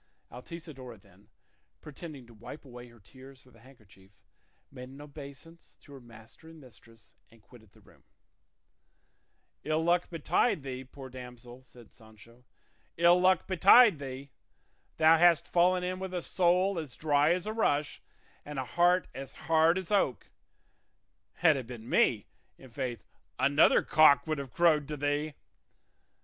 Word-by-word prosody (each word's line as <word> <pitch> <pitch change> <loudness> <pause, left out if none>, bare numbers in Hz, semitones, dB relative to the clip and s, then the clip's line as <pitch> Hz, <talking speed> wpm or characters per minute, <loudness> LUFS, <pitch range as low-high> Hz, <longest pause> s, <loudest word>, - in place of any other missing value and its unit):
Altisidora 130 -2 -10
then, 100 +1 -24 0.5
pretending 150 -3 -11
to 120 - -18
wipe 115 +7 -12
away 125 -1 -12
her 120 -1 -19
tears 130 +5 -17
with 125 - -22
a - - -20
handkerchief, 110 -6 -21 0.6
made 125 -2 -11
an 135 +2 -14
obeisance 145 +2 -13
to 145 - -17
her 135 - -11
master 115 +6 -16
and 165 -1 -15
mistress 115 -3 -19 0.2
and 115 -1 -22
quitted 110 0 -19
the - - -22
room. - - -23 1.6
"Ill 155 +1 -1
luck 175 +1 +1
betide 165 - 0
thee, 130 -1 -6
poor 130 +1 -12
damsel," 125 -1 -12
said 120 -3 -18
Sancho, 110 +2 -19 0.5
"ill 170 +2 +4
luck 185 -2 +2
betide 195 - +5
thee! 135 0 -9 0.7
Thou 160 0 +5
hast 170 -2 +4
fallen 180 +1 +2
in 185 +1 -4
with 190 -1 -6
a 175 - -4
soul 180 +1 +1
as 145 -6 -8
dry 150 0 +1
as 180 +2 -1
a 215 - -4
rush 150 -10 -1 0.4
and 150 -1 -9
a 130 - -3
heart 175 +6 +1
as 135 0 -9
hard 165 +2 +2
as 190 -1 -6
oak; 195 - -1 1.0
had 160 -3 +3
it 130 -4 -6
been 120 -2 -10
me, 110 -4 +1 0.3
i'faith 125 -5 -7 0.3
'another 145 +2 +3
cock 155 -2 +4
would 155 -2 -3
have 135 -3 -8
crowed 155 -4 +2
to 150 0 -6
thee. 145 +1 -2
140 Hz, 150 wpm, -29 LUFS, 125-165 Hz, 1.6 s, betide